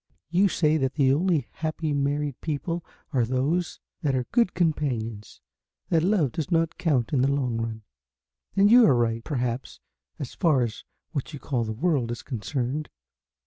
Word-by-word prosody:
You 185 +4 +4
say 155 -4 +2
that 135 -2 -1
the 135 -3 +4
only 165 0 +1
happy 155 -1 -2
married 145 -1 -1
people 165 +3 -3 0.3
are 125 -3 +3
those 135 +9 0 0.2
that 140 -3 +1
are 125 -1 0
good 235 -6 +2
companions, 125 - -1 0.5
that 165 -2 +3
love 175 - +2
does 160 +5 -3
not 165 -2 +1
count 140 -9 +1
in 130 - +3
the 135 +2 +3
long 130 -5 0
run, 115 -1 -4 0.7
and 200 +1 +5
you 245 +1 +9
are 135 - +5
right, 115 -1 0
perhaps, 125 -3 -3 0.4
as 140 - -6
far 155 -8 +3
as 115 -2 -5 0.3
what 145 +1 -4
you 145 - -6
call 125 -5 -1
the 110 - -3
World 135 -2 0
is 120 -1 -5
concerned. 130 +4 -3
140 Hz, 170 wpm, -26 LUFS, 125-165 Hz, 0.7 s, you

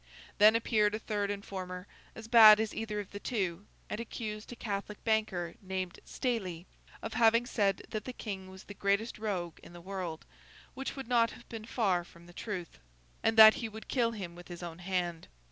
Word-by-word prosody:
Then 215 +2 +8
appeared 215 -2 +2
a - - -1
third 205 -2 -2
informer, 190 -2 -5 0.3
as 225 0 -9
bad 220 -2 +9
as 220 -1 -1
either 215 -1 -3
of 205 - -7
the 205 - -6
two, 195 -5 -2 0.2
and 210 - -4
accused 220 -2 -6
a - - -6
Catholic 205 -2 -5
banker 215 -6 0
named 185 -2 -4
Stayley 190 -10 -3 0.4
of 225 - -4
having 230 +1 +4
said 200 -5 0
that 215 -1 -4
the 255 - -4
King 195 -5 -6
was 190 +1 -11
the 205 - -10
greatest 200 +3 0
rogue 185 -6 -3
in - - -14
the 175 - -10
world 180 -3 -5 0.5
(which 270 +1 -5
would 270 -4 -6
not 235 -2 +4
have - - -13
been 225 -2 -7
far 195 -7 +1
from 170 0 -17
the 175 - -15
truth), 180 -4 -6 0.4
and 225 0 +1
that 220 0 +11
he 225 - -3
would 220 +1 -10
kill 235 -3 +1
him 190 -6 -6
with 175 0 -12
his 175 0 -8
own 170 -1 -7
hand. 175 -2 -2
205 Hz, 195 wpm, -32 LUFS, 185-225 Hz, 0.5 s, that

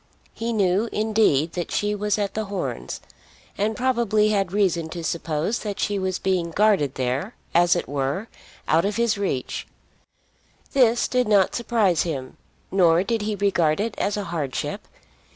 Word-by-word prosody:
He 230 +1 -3
knew, 205 +1 +1
indeed, 210 -8 +2
that 175 -2 -3
she 205 0 0
was 210 0 0
at 205 -2 -2
The 220 0 -2
Horns, 195 -2 -4 0.5
and 215 +2 0
probably 235 -5 +2
had 195 -4 +1
reason 180 -5 +1
to 170 +1 -6
suppose 160 +5 -1
that 210 -2 -5
she 205 -1 0
was 190 -1 -1
being 185 -3 0
guarded 190 -7 +2
there, 130 - -2 0.2
as 175 +1 +5
it 175 - -2
were, 140 - -2 0.4
out 160 +2 +3
of 200 +1 -1
his 235 -2 +2
reach. 190 -11 -3 1.1
This 240 -4 +4
did 250 -2 +1
not 200 -3 +4
surprise 220 -8 +2
him; 135 -6 -4 0.3
nor 175 -2 +4
did 225 +2 -1
he 210 0 -1
regard 180 -6 +2
it 220 +1 -1
as 205 +1 0
a 205 - -2
hardship. 155 -7 -4
200 Hz, 160 wpm, -24 LUFS, 170-215 Hz, 1.1 s, as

